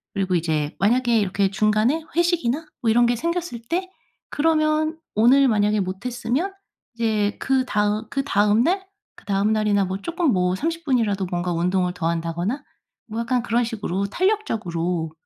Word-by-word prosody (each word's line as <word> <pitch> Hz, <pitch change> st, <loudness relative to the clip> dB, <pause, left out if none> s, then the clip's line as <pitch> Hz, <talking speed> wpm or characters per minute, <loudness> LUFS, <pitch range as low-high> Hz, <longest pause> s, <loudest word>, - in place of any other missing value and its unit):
그리고 190 Hz, -2 st, 0 dB
이제 155 Hz, -3 st, -1 dB
만약에 235 Hz, +2 st, +3 dB
이렇게 200 Hz, -1 st, +1 dB
중간에 215 Hz, +9 st, +2 dB
회식이나 330 Hz, -4 st, +1 dB, 0.2 s
뭐 230 Hz, -, +1 dB
이런 240 Hz, +2 st, +4 dB
게 240 Hz, -, +2 dB
생겼을 335 Hz, -2 st, -3 dB
때 370 Hz, +2 st, -1 dB, 0.4 s
그러면 310 Hz, +1 st, +1 dB, 0.2 s
오늘 255 Hz, +6 st, +5 dB
만약에 210 Hz, -2 st, +2 dB
못했으면 240 Hz, -, -2 dB, 0.4 s
이제 215 Hz, -3 st, 0 dB
그다음 215 Hz, -5 st, 0 dB
그다음 215 Hz, -5 st, +2 dB
날, 380 Hz, +4 st, 0 dB, 0.3 s
그다음 200 Hz, +2 st, 0 dB
날이나 210 Hz, -2 st, +2 dB
뭐 185 Hz, +1 st, -3 dB
조금 335 Hz, -, 0 dB
뭐 180 Hz, -1 st, +1 dB
30 330 Hz, -, -3 dB
분이라도 220 Hz, -8 st, +1 dB
뭔가 175 Hz, 0 st, -1 dB
운동을 180 Hz, +1 st, 0 dB
더 165 Hz, -2 st, -2 dB
한다거나 170 Hz, -, -2 dB, 0.4 s
뭐 225 Hz, 0 st, -5 dB
약간 240 Hz, +1 st, 0 dB
그런 240 Hz, +1 st, +1 dB
식으로 205 Hz, -4 st, -2 dB
탄력적으로 180 Hz, -, -1 dB
220 Hz, 330 characters per minute, -23 LUFS, 195-275 Hz, 0.4 s, 오늘